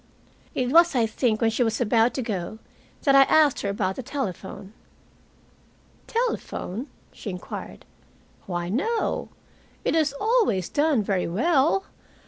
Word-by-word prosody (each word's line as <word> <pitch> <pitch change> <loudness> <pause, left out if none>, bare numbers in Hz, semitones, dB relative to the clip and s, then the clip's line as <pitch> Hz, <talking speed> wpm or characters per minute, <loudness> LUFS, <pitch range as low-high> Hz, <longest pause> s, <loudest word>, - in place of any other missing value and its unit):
It 250 -1 0
was, 335 0 +6
I 235 -2 +3
think, 220 0 0
when 225 -1 +3
she 225 - -1
was 225 -1 -1
about 230 0 +2
to 260 - -2
go 205 -2 -4 0.5
that 275 - +4
I 275 - +8
asked 295 0 +4
her 200 - -2
about 190 -1 -1
the - - -3
telephone. 200 - -5 1.3
"Telephone?" 300 - -3 0.2
she 215 - -8
inquired. 180 -1 -7 0.6
"Why, 175 -2 -3
no. 320 - -1 0.6
It - - +1
has 305 -3 +1
always 425 - +2
done 290 -6 +2
very 195 -2 0
well. 300 - +2
240 Hz, 135 wpm, -25 LUFS, 200-300 Hz, 1.3 s, I